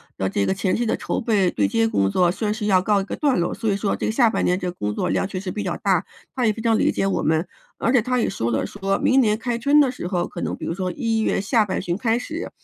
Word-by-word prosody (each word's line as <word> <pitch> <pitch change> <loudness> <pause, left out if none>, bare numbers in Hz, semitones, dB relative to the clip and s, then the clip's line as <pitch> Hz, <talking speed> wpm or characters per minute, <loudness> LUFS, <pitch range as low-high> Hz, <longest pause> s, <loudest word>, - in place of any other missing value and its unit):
的 95 0 -1
这 100 0 0
个 - - +1
前 190 0 0
期 240 - 0
的 - - +1
筹 - - -3
备 205 -6 +2
对 100 -9 +1
接 115 +2 +1
工 100 -3 +1
作 175 -1 +3
算 210 +2 -2
是 215 -1 -3
要 190 -2 +4
告 205 -1 +2
一 - - -3
个 - - -5
段 280 - +1
落， 175 - 0
所 225 -1 -4
以 - - +1
说 200 0 -1
这 - - -3
个 - - 0
下 230 -1 +4
半 - - -1
年 180 +1 +1
这 180 - -3
个 175 - -8
工 105 0 -2
作 - - -2
量 190 - 0
确 185 -2 -5
实 190 -1 -5
比 210 +3 -4
较 175 -2 -2
大， 190 -2 +1 0.3
他 250 -2 0
也 215 - +3
非 225 - -7
常 225 -1 +2
理 - - +2
解 195 - -1
我 195 - -1
们。 160 +3 +1 0.3
而 230 - +1
且 250 - +5
他 250 +2 -1
也 - - +1
说 120 -10 -2
了， 110 - 0
说 195 -1 -2
明 265 - +3
年 215 -4 +3
开 240 0 -2
春 285 +5 +4
的 265 - +2
时 215 -8 -6
候， 180 -2 -1
可 - - -8
能 - - -2
比 - - -7
如 165 - -2
说 185 -1 -2
一 225 +3 -1
月 220 - +1
下 215 +1 +2
半 190 - -2
旬 175 -1 -2
开 225 +2 +1
始， 320 +8 -5
200 Hz, 340 characters per minute, -22 LUFS, 180-230 Hz, 0.3 s, 且